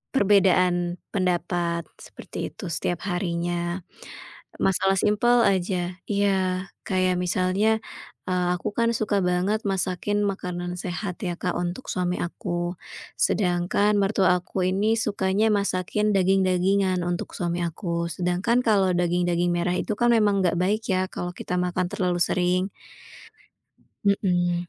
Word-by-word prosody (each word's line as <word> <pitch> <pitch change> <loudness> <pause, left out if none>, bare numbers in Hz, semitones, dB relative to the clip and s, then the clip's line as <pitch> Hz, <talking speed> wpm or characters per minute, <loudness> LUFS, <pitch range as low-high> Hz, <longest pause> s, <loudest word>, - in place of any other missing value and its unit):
perbedaan 180 -4 +3 0.2
pendapat, 175 -3 0 0.2
seperti - - -7
itu 190 - -7
setiap 175 +2 -2
harinya. 175 0 -2 0.8
Masalah 195 0 +2
simpel 235 +4 +3
aja 180 -2 0
iya, 190 -2 0 0.2
kayak 185 -1 +1
misalnya, 185 +5 +1 0.5
eee, 180 -1 +1
aku 210 +4 -4
kan 230 0 +2
suka 210 -2 0
banget 185 +5 0
masakin 195 +2 -1
makanan 180 -3 -3
sehat 180 +1 -5
ya, 175 -1 -2
Kak, 180 - -2
untuk 175 +8 -4
suami 180 -1 -1
aku, 175 0 -3 0.4
sedangkan 185 +2 +2
mertua 195 -2 +3
aku 180 +1 -2
ini 210 +4 +2
sukanya 205 -1 +1
masakin 200 +1 0
daging-dagingan 190 0 +2
untuk 175 0 -3
suami 175 0 -1
aku. 170 0 -3
Sedangkan 180 +8 +1
kalau 195 -4 +3
daging-daging 175 0 +1
merah 175 +1 0
itu 215 - -2
kan 240 0 +4
memang 205 -3 +3
nggak 175 -1 +1
baik 210 +4 +1
ya 185 -1 +2
kalau 175 0 -4
kita 180 - -4
makan 180 0 -1
terlalu 180 -2 0
sering. 180 +1 +1 1.4
Mhm. 175 -3 +1
185 Hz, 125 wpm, -25 LUFS, 175-200 Hz, 1.4 s, kan